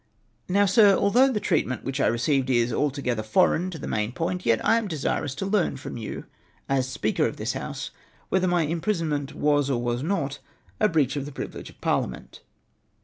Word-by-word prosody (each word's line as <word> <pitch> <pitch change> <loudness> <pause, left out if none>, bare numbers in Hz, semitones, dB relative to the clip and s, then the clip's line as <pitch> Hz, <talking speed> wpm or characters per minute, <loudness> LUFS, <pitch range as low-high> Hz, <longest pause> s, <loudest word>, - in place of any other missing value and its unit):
"Now, 200 +2 +4
Sir, 200 0 +6
although 245 +7 +4
the 215 - 0
treatment 145 - 0
which 135 +2 -3
I - - +3
received 130 +3 +1
is 120 -2 +2
altogether 135 -5 -1
foreign 180 - +2
to 175 - -7
the - - -7
main 105 +2 -1
point, 180 +5 -3
yet 115 - +4
I 230 - +4
am 225 - -4
desirous 145 -4 -2
to 190 - -3
learn 195 -7 +1
from 130 - -7
you 110 -3 -6 0.4
as 130 -1 0
Speaker - - 0
of - - -6
this - - -2
House, - - -5 0.4
whether 185 -1 +2
my 175 -2 +2
im 165 +2 -2
prisonment 155 -8 -1
was 145 -1 +2
or 130 -3 +1
was 120 0 -1
not 150 -4 -2 0.4
a 215 - +4
breach 150 -6 +1
of 140 0 -3
the - - -7
privilege - - -7
of - - -18
par - - +2
liament 65 - -8
145 Hz, 205 wpm, -25 LUFS, 130-185 Hz, 0.4 s, Sir